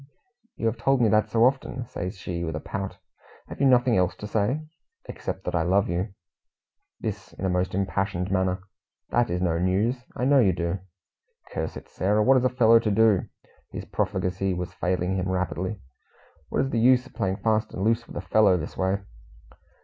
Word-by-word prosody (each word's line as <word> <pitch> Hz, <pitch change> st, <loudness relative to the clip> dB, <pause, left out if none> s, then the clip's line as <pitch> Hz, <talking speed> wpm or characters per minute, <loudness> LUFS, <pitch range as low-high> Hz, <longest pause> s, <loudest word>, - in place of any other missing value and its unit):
"You -, -, -4 dB
have 115 Hz, +1 st, +1 dB
told 135 Hz, +3 st, +2 dB
me 115 Hz, -3 st, +4 dB
that 110 Hz, +1 st, +3 dB
so 115 Hz, 0 st, +4 dB
often," 130 Hz, -1 st, 0 dB
says 95 Hz, -3 st, -5 dB
she, 85 Hz, -1 st, -4 dB
with 80 Hz, -2 st, -3 dB
a -, -, -2 dB
pout. 95 Hz, +3 st, -5 dB, 0.5 s
"Have -, -, -8 dB
you 140 Hz, -, +5 dB
nothing 125 Hz, -2 st, +4 dB
else 90 Hz, 0 st, +1 dB
to 105 Hz, -, -8 dB
say?" 110 Hz, +8 st, 0 dB, 0.4 s
"Except -, -, -5 dB
that -, -, -3 dB
I 85 Hz, -, +2 dB
love 95 Hz, +4 st, +2 dB
you." 95 Hz, +4 st, -2 dB, 0.8 s
This 100 Hz, -4 st, -5 dB
in 95 Hz, -, -5 dB
a 95 Hz, -, +1 dB
most 90 Hz, 0 st, 0 dB
impassioned 95 Hz, -1 st, -1 dB
manner. 95 Hz, -1 st, 0 dB, 0.5 s
"That 120 Hz, -1 st, +2 dB
is 90 Hz, +1 st, -1 dB
no 85 Hz, -2 st, +1 dB
news. 105 Hz, +8 st, +1 dB
I 125 Hz, -, -1 dB
know 140 Hz, +1 st, +5 dB
you 100 Hz, -7 st, +4 dB
do." 85 Hz, +2 st, -2 dB, 0.7 s
"Curse -, -, -3 dB
it, -, -, -11 dB
Sarah, 105 Hz, +3 st, +1 dB
what 130 Hz, +3 st, +5 dB
is 125 Hz, -, +1 dB
a 130 Hz, -, +4 dB
fellow 115 Hz, -2 st, +5 dB
to 115 Hz, -, -1 dB
do?" 105 Hz, -2 st, +4 dB, 0.4 s
His -, -, -7 dB
profligacy 95 Hz, +1 st, -1 dB
was 90 Hz, 0 st, -5 dB
failing 90 Hz, +1 st, -1 dB
him 95 Hz, 0 st, -1 dB
rapidly. 95 Hz, +2 st, -2 dB, 0.7 s
"What -, -, +1 dB
is 135 Hz, -, -3 dB
the 115 Hz, -, +1 dB
use 125 Hz, +2 st, +5 dB
of -, -, -16 dB
playing 95 Hz, 0 st, -1 dB
fast 110 Hz, -1 st, +1 dB
and 95 Hz, -, -4 dB
loose 115 Hz, +2 st, +1 dB
with -, -, -8 dB
a -, -, -2 dB
fellow 105 Hz, -4 st, +5 dB
this 85 Hz, -, -6 dB
way?" 95 Hz, +1 st, 0 dB
100 Hz, 200 wpm, -26 LUFS, 90-115 Hz, 0.8 s, you